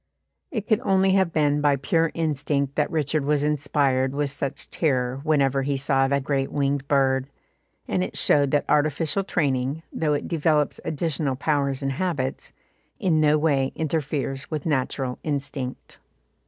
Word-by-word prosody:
It 215 - -4
could 215 -2 +3
only 195 -5 +2
have 190 -3 +2
been 150 -2 +2
by 145 -1 +3
pure 165 +5 +1
instinct 145 -3 -1
that 150 0 0
Richard 155 -2 0
was 145 0 +1
inspired 140 -3 +1
with 145 -1 -1
such 140 -1 -4
terror 130 -4 0
whenever 140 -3 +2
he 140 +1 -1
saw 135 -1 +2
the 140 +1 +1
great 135 0 -1
winged 140 -1 -1
bird, 135 -2 +2 0.6
and 95 -1 0
it 90 - -4
showed 145 -1 +3
that 145 +1 +1
artificial 155 +5 +1
training, 140 -3 -1
though 150 -2 +1
it - - -3
develops 155 -3 +1
additional 150 -3 -1
powers 140 -1 0
and 135 - 0
habits, 135 -4 -3 0.5
in 175 -8 +2
no 150 0 +4
way 140 -4 +1
interferes 145 -3 -2
with 155 -3 -4
natural 130 -3 -1
instinct. 140 -3 -4
145 Hz, 155 wpm, -24 LUFS, 135-155 Hz, 0.6 s, no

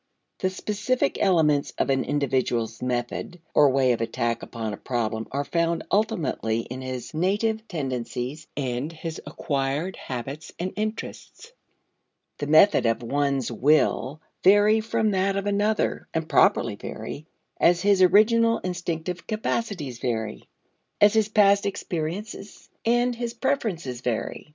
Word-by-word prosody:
The 185 - +1
specific 210 +6 -1
elements 155 -7 +3
of - - +1
an 135 -1 +1
individual's 125 -5 -1
method 125 +7 -3
or 145 -1 +6
way 130 -1 +3
of 115 - -1
attack 115 0 -1
upon 110 -3 -5
a - - -6
problem 115 -3 -2
are 140 +1 -1
found 170 +1 0
ultimately 155 - 0
in 125 +3 -7
his 130 +1 -6
native 215 +6 0
tendencies 135 - -4
and 130 +2 -2
his 165 0 -6
acquired 145 +4 -2
habits 135 +4 -6
and 185 +2 -3
interests. 215 - -5 0.9
The 145 - -3
method 155 - +5
of 115 +1 0
one 140 +2 0
will 145 +2 +2 0.2
vary 205 +3 +6
from 220 -1 0
that 195 0 +1
of 195 0 -2
another 205 +1 0
(and 160 -1 -1
properly - - +3
vary) 155 +2 -7 0.3
as 175 0 +4
his 200 -2 +4
original 230 +5 +5
instinctive 175 -1 -4
capacities 205 - -3
vary, 110 -4 -3 0.5
as 205 0 +6
his 220 -1 +2
past 200 -1 +4
experiences 195 +3 -5
and 240 +2 +2
his 235 0 -4
preferences 195 - -2
vary. 125 +4 -3
160 Hz, 130 wpm, -25 LUFS, 130-205 Hz, 0.9 s, or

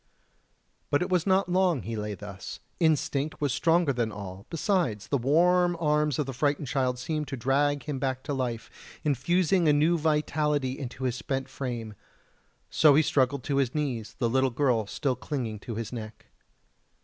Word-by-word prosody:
But 145 +4 +2
it - - -4
was 180 0 +2
not 190 -1 +3
long 180 -5 +2
that - - -13
he 115 +1 -3
lay 105 -1 -3
thus 100 -1 -8 0.2
instinct 155 -2 +1
was 145 -4 0
stronger 165 -3 +3
than 120 -3 -1
all; 100 -1 -8
besides, 165 - 0
the 140 - +2
warm 175 +6 +3
arms 150 -3 +1
of 150 - 0
the 135 - -5
frightened 145 +3 0
child 130 -1 0
seemed 150 +4 -3
to 135 - -5
drag 140 +3 +1
him 145 -3 -4
back 130 0 -2
to 145 - -3
life, 125 -4 -3 0.3
infusing 170 +6 +2
new 155 +3 +3
vitality 150 -3 0
into 130 -1 -6
his 125 -2 0
spent 135 +1 -3
frame; 120 -5 -5 0.8
so 150 -3 +6
he 155 - +5
struggled 135 -2 +1
to 140 - -1
his 135 -1 +1
knees, 130 -8 -2
the 120 - +1
little 130 +3 +2
girl 120 -4 +1
still 130 +4 -1
clinging 125 -5 -4
to 115 +1 -6
his 115 +2 -5
neck. 110 -2 -8
140 Hz, 175 wpm, -28 LUFS, 120-155 Hz, 0.8 s, so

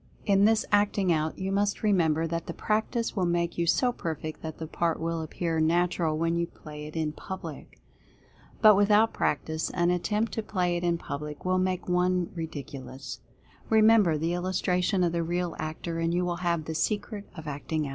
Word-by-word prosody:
In 200 -1 +4
this 220 0 +3
Acting 205 -3 +3
Out, 155 0 -1
you 190 +1 -2
must 205 +2 0
remember 165 -6 +3
that 165 0 -3
the - - -5
practice 225 +2 -1
will 185 -3 +1
make 170 0 0
you 170 - +1
so 245 +8 +3
perfect 160 -7 -5
that 160 -1 -6
the 160 - -5
part 165 +1 -1
will 165 0 -2
appear 165 +1 -2
natural 165 0 +2
when 165 +1 +1
you 170 0 0
play 150 -2 -9
it 155 - -11
in 160 -2 0
public. 190 +5 -8 0.8
But 215 -1 +9
with 200 +1 +3
out 215 +2 +5
practice, 160 +2 -1
an 175 0 +1
attempt 210 +5 0
to 225 - -2
play 180 -4 0
it 175 - -2
in 170 -1 +2
public 150 0 -6
will 185 0 +2
make 185 -1 -1
one 180 0 +1
ridiculous. 140 -5 -7 0.5
Remember 215 -6 +5
the 165 +3 -1
illustration 180 +1 +1
of 170 - +2
the 170 0 0
real 175 +1 -2
actor, 165 +2 -4
and 165 0 +1
you 180 +1 +1
will 175 -1 -1
have 170 -3 -1
the 160 - -4
secret 205 +4 -2
of 160 -1 -8
Acting 150 +2 -2
Out. - - -4
175 Hz, 195 wpm, -28 LUFS, 160-190 Hz, 0.8 s, But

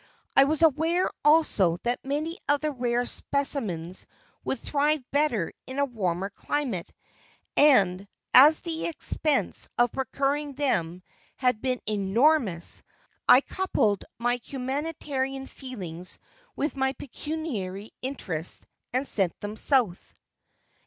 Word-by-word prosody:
I 275 - +7
was 310 +3 0
aware 325 +4 +3
also 255 - +4
that 240 +1 -1
many 305 +7 -3
of 290 0 +3
the 305 0 0
rare 245 -2 0
specimens 210 - -1 0.4
would 265 - -1
thrive 295 +1 0
better 275 - +1
in 260 - -6
a 280 - +3
warmer 195 -6 -2
climate, 245 -6 -3 0.6
and 200 -10 +4 0.3
as 300 +4 +8
the 330 -2 -2
expense 305 -2 0
of 240 -1 +3
procuring 280 +2 -1
them 185 - -1 0.3
had 250 -4 +1
been 255 -2 -1
enormous, 210 - +2 0.5
I 255 - +9
coupled 220 - 0
my 245 +1 0
humanitarian 270 0 -3
feelings 185 - -6 0.4
with 295 +1 -2
my 265 0 0
pecuniary 235 - -5
interests 185 - -3 0.3
and 260 +2 0
sent 190 -5 +1
them 205 +1 -5
South. 230 -7 +1
260 Hz, 115 wpm, -27 LUFS, 205-290 Hz, 0.6 s, I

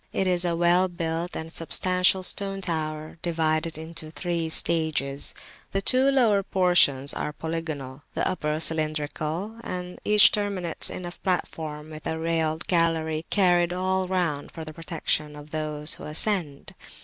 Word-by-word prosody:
It 195 - 0
is 180 -1 +2
a 170 -1 0
well 175 +2 +4
built 170 0 -3
and 160 0 -6
substantial 185 +3 +2
stone 195 +1 0
tower 155 -2 -3
divided 160 -1 0
into 160 0 -7
three 170 0 -2
stages; 155 -4 +2 0.4
the 195 - +1
two 260 +4 +4
[p.334] - - +1
lower 220 -6 +4
portions 175 -8 +3
are - - -3
polygonal, 155 -4 -5
the - - 0
upper 155 -3 -1
cylindrical, 155 +5 -2
and 180 0 -6
each 210 0 +7
terminates 200 -5 0
in 180 - -6
a 175 - -5
platform 160 -4 -3
with 155 0 -7
a 160 - -2
railed 160 -1 -1
gallery 165 -2 0
carried 175 -3 +3
all 185 +1 0
round 175 -6 -1
for 160 - -8
the 155 - -8
protection 155 -2 -2
of 150 +1 -12
those 150 -1 0
who - - -8
ascend. 155 -3 -1
165 Hz, 150 wpm, -25 LUFS, 155-180 Hz, 0.4 s, each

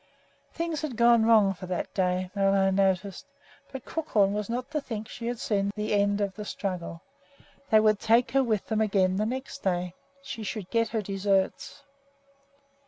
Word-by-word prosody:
Things 335 -2 -3
had 285 -7 -4
gone 235 -1 +5
wrong 215 -4 +5
for 185 0 -9
that 180 -1 -3
day, 185 -1 0
Ole 195 0 +2
acknowledged; 195 0 +1 0.5
but 265 -2 -8
Crookhorn 210 -11 +1
was 210 0 -3
not 250 +4 -4
to 300 -1 -1
think 220 -5 -5
that - - -14
she 230 - -6
had 240 0 -2
seen 200 -2 0
the 210 0 -2
end 205 0 +2
of 200 -1 -1
the 210 - -7
struggle. 180 -5 -5 0.7
They 220 - +6
would 215 -1 +3
take 230 +1 +3
her 270 +2 +3
with 220 -5 -1
them 220 -1 -1
again 190 -3 +2
the 215 +1 0
next 260 +3 -5
day. 180 -2 -1 0.3
She 270 -4 -7
should 210 -2 -5
get 230 0 +2
her 220 -1 -2
deserts. 195 +6 -1
210 Hz, 180 wpm, -27 LUFS, 195-230 Hz, 0.7 s, They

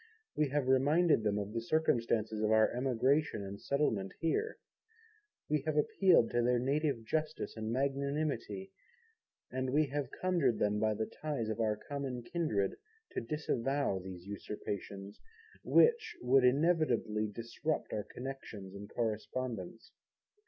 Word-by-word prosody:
We 150 -2 +2
have 145 -1 0
reminded 145 +3 +4
them 105 -1 +1
of 105 +1 -3
the 115 - -1
circumstances 115 -6 +1
of 110 - +2
our 110 0 +5
emigration 130 0 +1
and 100 +1 -7
settlement 110 -10 0
here. 425 - 0 0.9
We 150 -1 +1
have 155 -1 0
appealed 160 -4 +4
to 120 - +2
their 125 +1 +3
native 135 -1 0
justice 155 +4 -2
and 110 0 -3
magnanimity, 140 +8 -1 0.8
and 130 0 -1
we 150 +4 +3
have 140 -2 -2
conjured 170 -11 +2
them 105 0 +1
by 110 0 +2
the 110 +1 -1
ties 140 -7 -3
of 110 - -3
our 110 -2 +2
common 135 -1 -5
kindred 115 - -1 0.3
to 380 +1 -2
disavow 140 - -1
these 90 -1 -9
usurpations, 100 -1 -6 0.4
which 470 -1 +4
would 125 +1 +5
inevitably 125 -7 +2
interrupt 115 +9 -3
our 105 - -1
connections 120 -8 -7
and 100 +1 -9
correspondence. 115 -2 -3
125 Hz, 135 wpm, -33 LUFS, 110-150 Hz, 0.9 s, our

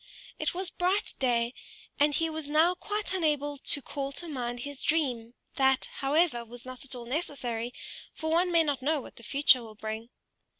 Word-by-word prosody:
It - - 0
was 370 0 +1
bright 375 +4 +1
day, 240 -2 +2 0.5
and 290 0 +4
he 330 - +2
was 315 -2 -5
now 320 +4 +5
quite 415 +2 -3
unable 295 -5 0
to 285 - -1
call 275 -1 -4
to 345 - -1
mind 245 -5 -3
his 285 0 -6
dream; 250 -7 0 0.2
that, 265 -1 +4
however, 280 -3 +2
was 235 +1 -9
not 255 -1 -4
at 275 -1 -4
all 240 -1 -7
necessary, 245 -4 -2 0.4
for 315 0 -3
one 350 +2 +3
may 335 -1 +5
not 285 -4 -1
know 300 +3 +2
what - - -11
the - - -10
future 275 +1 +5
will 220 -2 -10
bring. 220 +2 -5
280 Hz, 185 wpm, -29 LUFS, 245-320 Hz, 0.5 s, now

